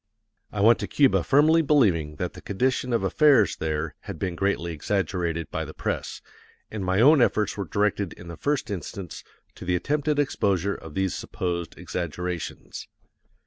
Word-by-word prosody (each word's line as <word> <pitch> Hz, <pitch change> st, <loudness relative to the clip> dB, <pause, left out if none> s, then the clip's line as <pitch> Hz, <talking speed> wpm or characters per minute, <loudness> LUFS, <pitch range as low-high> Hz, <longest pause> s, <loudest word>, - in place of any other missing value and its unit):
I 105 Hz, -, -2 dB
went 115 Hz, +3 st, +6 dB
to -, -, -3 dB
Cuba 140 Hz, -3 st, +3 dB
firmly 155 Hz, +4 st, +5 dB
believing 95 Hz, -, +2 dB
that 90 Hz, +3 st, -4 dB
the -, -, -11 dB
condition 125 Hz, +4 st, -1 dB
of 115 Hz, -4 st, +1 dB
affairs 130 Hz, -, +4 dB
there 80 Hz, -1 st, -2 dB, 0.2 s
had -, -, -5 dB
been 90 Hz, -3 st, -3 dB
greatly 85 Hz, -2 st, -1 dB
exaggerated 85 Hz, -1 st, -2 dB
by -, -, -2 dB
the -, -, -9 dB
press, -, -, -4 dB, 0.5 s
and 105 Hz, -3 st, -4 dB
my 95 Hz, +1 st, +1 dB
own 140 Hz, +4 st, +6 dB
efforts 105 Hz, -3 st, +2 dB
were 100 Hz, -, -3 dB
directed 100 Hz, +1 st, 0 dB
in 90 Hz, -, -13 dB
the 85 Hz, -, -7 dB
first 145 Hz, -, -1 dB
instance 95 Hz, -2 st, -6 dB, 0.3 s
to -, -, -11 dB
the 90 Hz, 0 st, 0 dB
attempted 145 Hz, -, 0 dB
exposure 100 Hz, -, +1 dB
of 80 Hz, -5 st, -10 dB
these 95 Hz, -1 st, 0 dB
supposed 85 Hz, -2 st, -4 dB
exaggerations. 90 Hz, 0 st, -5 dB
95 Hz, 165 wpm, -25 LUFS, 85-125 Hz, 0.5 s, went